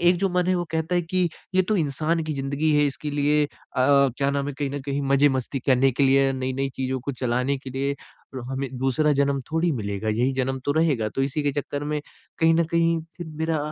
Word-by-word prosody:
एक 175 Hz, +1 st, +4 dB
जो 195 Hz, 0 st, +1 dB
मन 180 Hz, 0 st, +1 dB
है 185 Hz, -, +3 dB
वो 175 Hz, -, -1 dB
कहता 160 Hz, +2 st, -1 dB
है 175 Hz, -, +2 dB
कि 180 Hz, +1 st, 0 dB, 0.3 s
ये 185 Hz, -, +5 dB
तो 210 Hz, +3 st, 0 dB
इंसान 160 Hz, +1 st, 0 dB
की 155 Hz, -1 st, -3 dB
ज़िंदगी 140 Hz, +3 st, -1 dB
है 145 Hz, -, +4 dB
इसके 145 Hz, +1 st, -4 dB
लिए 150 Hz, +1 st, +2 dB
अ, -, -, -23 dB, 0.3 s
क्या 140 Hz, 0 st, +3 dB
नाम 140 Hz, 0 st, -1 dB
है -, -, -3 dB
कहीं 140 Hz, -2 st, -1 dB
न 145 Hz, 0 st, -4 dB
कहीं 140 Hz, 0 st, -2 dB
मज़े 140 Hz, +1 st, +4 dB
मस्ती 135 Hz, +1 st, -2 dB
करने 135 Hz, 0 st, +4 dB
के 140 Hz, -, 0 dB
लिए 135 Hz, 0 st, +4 dB
नई-नई 130 Hz, +1 st, -2 dB
चीज़ों 130 Hz, 0 st, -2 dB
को 140 Hz, +3 st, -4 dB
चलाने 125 Hz, +2 st, 0 dB
के 130 Hz, -1 st, -9 dB
लिए 140 Hz, +2 st, -1 dB, 0.4 s
और 130 Hz, -, -5 dB
हमें 135 Hz, 0 st, -2 dB
दूसरा 140 Hz, +4 st, +2 dB
जन्म 140 Hz, -1 st, +1 dB
थोड़ी 165 Hz, +1 st, +2 dB
मिलेगा, 100 Hz, -3 st, -3 dB
यही 120 Hz, +5 st, +1 dB
जन्म 130 Hz, 0 st, -1 dB
तो 145 Hz, -, +1 dB
रहेगा। 145 Hz, -9 st, +1 dB
तो 135 Hz, +5 st, -2 dB
इसी 140 Hz, +2 st, -1 dB
के 145 Hz, -1 st, +1 dB
चक्कर 145 Hz, +1 st, -5 dB
में 150 Hz, 0 st, -1 dB, 0.4 s
कहीं 165 Hz, 0 st, +4 dB
न 170 Hz, -, +3 dB
कहीं 165 Hz, 0 st, +2 dB, 0.2 s
फिर 175 Hz, -2 st, -7 dB
मेरा 160 Hz, 0 st, -2 dB
140 Hz, 235 wpm, -24 LUFS, 135-160 Hz, 0.4 s, ये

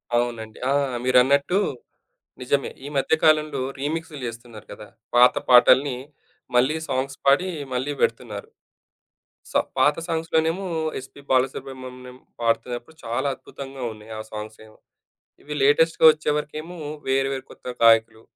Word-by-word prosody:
అవునండి. 115 Hz, -2 st, -2 dB
ఆ! -, -, +3 dB, 0.3 s
మీరన్నట్టు 140 Hz, +8 st, +4 dB, 0.8 s
నిజమే. 140 Hz, +2 st, 0 dB
ఈ -, -, -5 dB
మధ్య 135 Hz, -, +2 dB
కాలంలో 155 Hz, -3 st, +3 dB, 0.2 s
రీమిక్స్‌లు 155 Hz, +1 st, -4 dB
చేస్తున్నారు 115 Hz, -2 st, -9 dB
కదా! 105 Hz, +1 st, -11 dB, 0.3 s
పాత 125 Hz, +1 st, +7 dB, 0.2 s
పాటల్ని 125 Hz, +2 st, +6 dB, 0.6 s
మళ్ళీ 130 Hz, +6 st, +3 dB
సాంగ్స్ 135 Hz, +2 st, -2 dB
పాడి 145 Hz, +7 st, +4 dB, 0.3 s
మళ్ళీ 130 Hz, +4 st, -1 dB
పెడుతున్నారు. 115 Hz, -3 st, -2 dB, 1.0 s
సో, -, -, +2 dB, 0.2 s
పాత 145 Hz, +3 st, +4 dB
సాంగ్స్‌లో 165 Hz, -1 st, 0 dB
నేమో 170 Hz, +4 st, -1 dB, 0.4 s
ఎస్‌పీ 135 Hz, +2 st, -13 dB
బాలసుబ్రహ్మణ్యం 130 Hz, -1 st, -2 dB, 0.2 s
పాడుతున్నప్పుడు 120 Hz, +5 st, -2 dB
చాలా 120 Hz, +4 st, -1 dB
అద్భుతంగా 135 Hz, 0 st, -9 dB
ఉన్నాయి 110 Hz, 0 st, -13 dB
ఆ -, -, -3 dB
సాంగ్సేమో. 110 Hz, 0 st, -9 dB, 0.6 s
ఇవి 150 Hz, -, -7 dB
లేటెస్ట్‌గా 160 Hz, +4 st, +4 dB
వచ్చేవరకేమో 155 Hz, +2 st, -3 dB, 0.3 s
వేరు 135 Hz, 0 st, +2 dB
వేరు 135 Hz, -, -6 dB
కొత్త -, -, -17 dB, 0.2 s
గాయకులు. 115 Hz, -1 st, +5 dB
130 Hz, 120 wpm, -23 LUFS, 120-150 Hz, 1.0 s, పాత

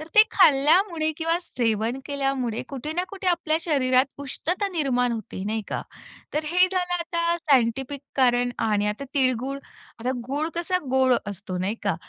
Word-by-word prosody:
तर 310 Hz, -, -8 dB
ते 430 Hz, -, +10 dB
खाल्ल्यामुळे 315 Hz, +1 st, +4 dB
किंवा 330 Hz, +1 st, 0 dB
सेवन 230 Hz, -, -1 dB
केल्यामुळे 270 Hz, -5 st, -2 dB
कुठे 280 Hz, +2 st, -5 dB
ना 355 Hz, +3 st, 0 dB
कुठे 390 Hz, -1 st, -7 dB
आपल्या 320 Hz, -3 st, +1 dB
शरीरात 260 Hz, -6 st, +3 dB
उष्णता 350 Hz, +8 st, -2 dB
निर्माण 255 Hz, -8 st, 0 dB
होते 220 Hz, -4 st, -6 dB
नाही 220 Hz, +1 st, -2 dB
का. -, -, -2 dB, 0.5 s
तर 305 Hz, -, 0 dB
हे 360 Hz, +1 st, +5 dB
झालं 360 Hz, -2 st, 0 dB
आता 335 Hz, 0 st, 0 dB
सायंटिफिक 270 Hz, -2 st, +1 dB, 0.2 s
कारण 245 Hz, -2 st, +3 dB, 0.2 s
आणि 210 Hz, -1 st, +1 dB
आता 210 Hz, +6 st, -3 dB
तिळगूळ 260 Hz, 0 st, +1 dB, 0.4 s
आता 245 Hz, +3 st, -1 dB, 0.2 s
गूळ 290 Hz, +4 st, -1 dB
कसा 345 Hz, +2 st, 0 dB
गोड 260 Hz, -1 st, +4 dB
असतो 195 Hz, -2 st, -5 dB
नाही 190 Hz, +4 st, -1 dB
का. 200 Hz, -3 st, +1 dB
275 Hz, 160 wpm, -25 LUFS, 245-335 Hz, 0.5 s, ते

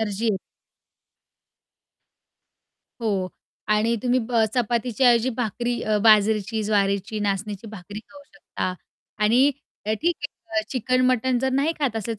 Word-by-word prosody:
Energy 210 Hz, 0 st, -2 dB
येते. 210 Hz, -, +2 dB, 2.6 s
हो. 200 Hz, -5 st, -1 dB, 0.4 s
आणि 215 Hz, +2 st, +2 dB
तुम्ही 250 Hz, 0 st, +2 dB
ब 230 Hz, -2 st, +3 dB
चपातीच्या 240 Hz, 0 st, +1 dB
ऐवजी 235 Hz, +1 st, +3 dB
भाकरी 240 Hz, +1 st, -2 dB
अ, 215 Hz, -1 st, +1 dB
बाजरीची, 215 Hz, 0 st, +4 dB
ज्वारीची, 200 Hz, 0 st, 0 dB
नाचणीची 205 Hz, +1 st, -2 dB
भाकरी 205 Hz, 0 st, -8 dB
खाऊ 285 Hz, 0 st, -14 dB
शकता. 230 Hz, -9 st, -4 dB, 0.5 s
आणि 250 Hz, +6 st, +5 dB, 0.4 s
ठीक 220 Hz, +12 st, +1 dB, 0.4 s
आहे 220 Hz, -, +2 dB
चिकन-मटण 255 Hz, 0 st, +1 dB
जर 265 Hz, +2 st, 0 dB
नाही 280 Hz, +5 st, +2 dB
खात 265 Hz, -6 st, 0 dB
असेल 225 Hz, +1 st, -3 dB
225 Hz, 120 wpm, -24 LUFS, 210-250 Hz, 2.6 s, आणि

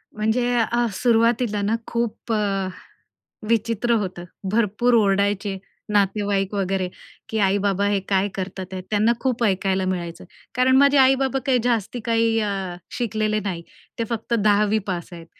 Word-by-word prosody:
म्हणजे 220 Hz, +3 st, +1 dB
अ, 240 Hz, +1 st, +1 dB
सुरुवातीला 230 Hz, -1 st, +2 dB
ना, 210 Hz, +3 st, +1 dB
खूप 235 Hz, -1 st, -3 dB
अ, 200 Hz, -3 st, 0 dB, 0.8 s
विचित्र 230 Hz, +1 st, +1 dB
होतं. 185 Hz, -3 st, -5 dB, 0.3 s
भरपूर 230 Hz, +2 st, +2 dB
ओरडायचे, 200 Hz, -1 st, +1 dB, 0.4 s
नातेवाईक 200 Hz, -1 st, +1 dB
वगैरे, 195 Hz, -2 st, -1 dB, 0.4 s
की 220 Hz, -, -2 dB
आई-बाबा 200 Hz, 0 st, +1 dB
हे 205 Hz, -1 st, +1 dB
काय 195 Hz, 0 st, +2 dB
करतात 190 Hz, 0 st, -5 dB
हे, 185 Hz, -, -4 dB
त्यांना 215 Hz, +2 st, +3 dB
खूप 250 Hz, -2 st, -1 dB
ऐकायला 190 Hz, -2 st, +1 dB
मिळायचं. 170 Hz, -2 st, -4 dB, 0.3 s
कारण 255 Hz, +1 st, +4 dB
माझे 280 Hz, +1 st, +5 dB
आई-बाबा 265 Hz, 0 st, +4 dB
काही 255 Hz, -2 st, +3 dB
जास्ती 240 Hz, -1 st, 0 dB
काही 230 Hz, -1 st, +2 dB
अ, 195 Hz, -4 st, -2 dB, 0.2 s
शिकलेले 215 Hz, -2 st, 0 dB
नाही. 180 Hz, -4 st, -4 dB, 0.4 s
ते -, -, +1 dB
फक्त 230 Hz, 0 st, -3 dB
10वी 210 Hz, -1 st, +3 dB
पास 175 Hz, -3 st, -3 dB
आहेत. 170 Hz, -1 st, -10 dB
210 Hz, 140 wpm, -22 LUFS, 195-235 Hz, 0.8 s, माझे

